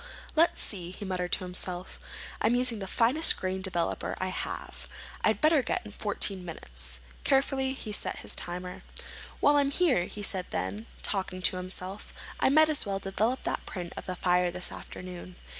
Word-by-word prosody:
"Let's 330 +2 +4
see," 180 -5 -1
he 185 +3 -7
muttered 180 -2 -2
to - - +3
himself. 180 0 -4 0.4
"I'm 240 - +4
using 245 -3 +3
the 195 - -4
finest 250 +11 +4
grain 190 0 -2
developer 180 -3 -1
I 185 - -1
have. 185 - -5 0.4
I'd - - +3
better 310 -1 +5
give - - 0
it 210 - -9
fourteen 200 -3 +1
minutes." 65 - -5 0.2
Carefully 270 -1 +2
he 235 -5 -6
set 210 - -1
his - - -2
timer. 180 +1 -3 0.6
"While 290 0 +6
I'm 280 -1 +4
here," 280 - +3
he 205 - -6
said 190 -2 +1
then, 95 +4 -3
still - - -18
talking 190 -2 0
to 185 - +4
himself, 185 +2 -5 0.3
"I - - +4
might 310 +3 +6
as 305 - +4
well 195 -2 -1
develop 210 +6 0
that - - -2
print 175 -3 -5
of - - -7
the 185 - -2
fire 180 -1 +3
this 180 +1 -2
afternoon. 180 0 -8
190 Hz, 180 wpm, -29 LUFS, 180-245 Hz, 0.6 s, While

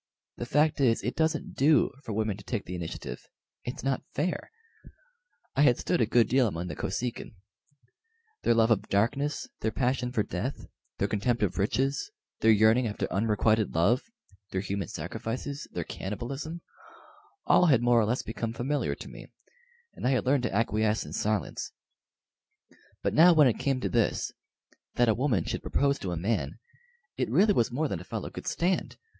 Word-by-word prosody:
The 120 - -5
fact 150 +2 +2
is, 115 -4 +3
it 125 - -2
doesn't 160 -1 0
do 150 +3 +4
for - - -6
women 110 -1 -1
to 100 - -12
take 100 +2 -3
the 90 - -6
initiative 85 -2 -6 0.4
it's 125 - -6
not 135 -1 0
fair. 180 - -2 1.1
I 140 - +3
had 125 -5 +5
stood - - 0
a 115 - +3
good 115 -1 +4
deal 130 -1 +3
among 90 -2 -4
the 80 - -5
Kosekin. 120 +3 -4 1.1
Their 115 - +3
love 115 0 +4
of 110 - +1
darkness, 140 +9 0
their 110 - 0
passion 125 +1 0
for 115 -4 +1
death, 105 +11 -4 0.3
their 100 - +1
contempt 110 +3 0
of 95 -2 -1
riches, 135 - 0 0.3
their 110 - +3
yearning 110 +3 +5
after 105 - -2
unrequited 110 0 +2
love, 105 +10 +3 0.5
their 95 - -2
human 100 -2 -3
sacrifices, 135 +5 -5
their - - -3
cannibalism, 135 - -5 0.8
all 180 - +5
had 130 -6 +4
more 120 -1 +5
or 110 - +3
less 120 +4 -1
become 115 0 -4
familiar 135 +6 -1
to - - -10
me, - - -11 0.7
and - - -3
I 135 - +3
had 130 - 0
learned 135 +1 +3
to - - -1
acquiesce 110 0 +1
in - - -9
silence; 105 -1 -2 1.3
but - - 0
now 170 +3 +7
when 155 -3 +6
it 120 - 0
came 135 -2 0
to - - 0
this 115 -2 +1 0.6
that 120 -1 +3
a - - +5
woman 115 - +1
should - - -3
propose 140 0 +1
to 95 -3 -4
a 85 - -2
man 90 -4 -1 0.6
it - - -1
really 205 +1 +4
was 120 -10 +1
more 150 +6 0
than 95 - -3
a - - -9
fellow - - -5
could - - -8
stand. 180 +2 0
115 Hz, 180 wpm, -28 LUFS, 105-135 Hz, 1.3 s, now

